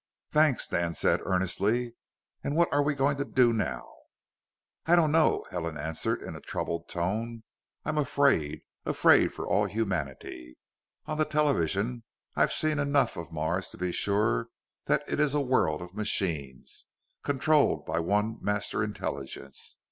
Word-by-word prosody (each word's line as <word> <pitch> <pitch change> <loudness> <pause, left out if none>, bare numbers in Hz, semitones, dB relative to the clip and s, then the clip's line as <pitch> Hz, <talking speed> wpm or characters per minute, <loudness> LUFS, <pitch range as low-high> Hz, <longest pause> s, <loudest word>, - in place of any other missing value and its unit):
"Thanks," 150 -5 +3
Dan 85 -1 -1
said, - - +2
earnestly. 100 +6 0 0.5
"And 145 - -2
what 170 -2 +3
are 145 - +4
we 145 +1 +1
going 140 +1 +1
to 140 - 0
do 125 -4 +3
now?" 70 - -2 1.0
"I 170 - +6
don't 160 -4 +4
know," 160 0 +3
Helen 85 -3 -3
answered 80 +2 -2
in - - -7
a - - -9
troubled 85 0 -4
tone. 110 +6 -2 0.4
"I'm 155 0 0
afraid. 135 - +2 0.2
Afraid - - +4
for - - -6
all - - +2
humanity. 70 - -4 0.5
On 155 0 -4
the 155 - +3
television, 125 - 0 0.3
I've - - +3
seen 155 -1 +1
enough 140 0 +2
of 85 0 -7
Mars 80 +4 -1
to - - -12
be 90 0 -1
sure 100 - +1 0.4
that - - +2
it - - -2
is 150 -1 +2
a - - +3
world 125 - +1
of 90 +1 -11
machines, 85 -10 -3 0.3
controlled 145 +2 +2
by - - -1
one 105 +6 0
Master 105 0 -1
Intelligence. 70 -9 -6
105 Hz, 150 wpm, -28 LUFS, 85-140 Hz, 1.0 s, I